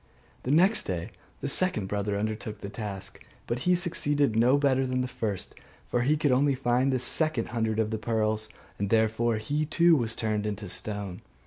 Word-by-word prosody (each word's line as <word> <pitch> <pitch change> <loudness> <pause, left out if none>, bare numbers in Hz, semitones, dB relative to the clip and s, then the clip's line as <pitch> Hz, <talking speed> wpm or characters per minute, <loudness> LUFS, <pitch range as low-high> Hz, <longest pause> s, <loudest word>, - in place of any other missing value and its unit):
The - - -5
next 185 +9 +4
day 85 -3 -3 0.3
the - - -2
second 180 - +1
brother 100 +1 -1
undertook 110 +1 -4
the 100 - -5
task; 100 -3 -7 0.2
but 120 - -2
he 180 - +6
succeeded 145 - +1
no 120 +5 +5
better 135 -2 +2
than 130 0 0
the 125 - -1
first; 105 -6 -4 0.3
for 120 - 0
he 145 +5 +2
could 150 -2 +2
only 135 +2 +3
find 130 +1 +1
the 130 - +2
second 155 +5 0
hundred 110 -2 -1
of 110 -1 0
the 110 - -2
pearls; 110 -1 -1 0.3
and 100 0 -1
therefore 110 +1 +2
he 145 +8 -1
too 170 +2 +4
was 115 -5 -1
turned 105 -2 -1
into 105 -2 -4
stone. 100 0 -4
115 Hz, 190 wpm, -28 LUFS, 105-135 Hz, 0.3 s, he